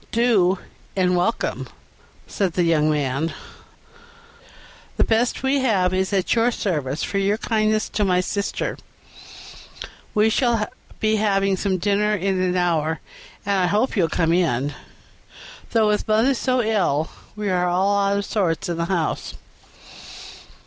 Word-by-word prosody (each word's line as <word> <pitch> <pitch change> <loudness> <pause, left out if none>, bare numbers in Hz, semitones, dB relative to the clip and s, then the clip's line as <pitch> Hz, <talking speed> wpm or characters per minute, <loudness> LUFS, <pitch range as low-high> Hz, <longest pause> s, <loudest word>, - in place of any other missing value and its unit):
"Do, 210 -6 +3 0.4
and 180 -1 +2
welcome," 180 +6 -1 0.6
said 190 -4 -2
the 180 - +1
young 155 -2 +2
man; 145 +1 -1 1.6
"the - - +3
best 235 +3 +1
we 270 +1 +2
have 195 -8 +2
is 190 +1 0
at 195 -2 +1
your 235 +1 +3
service 150 - -2
for 200 - -1
your 200 +2 +1
kindness 215 -2 0
to 210 - -1
my 180 -2 +2
sister; 200 +2 -2 1.4
we 215 +1 +4
shall 230 -3 +1 0.3
be 215 0 +2
having 195 -2 +2
some 190 0 -1
dinner 205 +3 +1
in 190 -1 -1
an 180 -1 0
hour, 165 -3 0 0.5
and 200 -1 +1
I 180 - +2
hope 210 +8 +1
you'll 175 -6 +2
come 165 -1 +1
in, 145 -5 +1 1.0
though 220 -2 +3
with 210 +1 0
mother 220 +5 +3
so 255 0 0
ill 180 -9 0 0.2
we 210 -2 -2
are 180 -1 +1
all 190 +3 +2
out 200 0 +1
of 200 - -2
sorts 180 -6 -1
in 170 - -2
the 170 - -1
house." 170 -3 -2
195 Hz, 145 wpm, -22 LUFS, 175-215 Hz, 1.6 s, we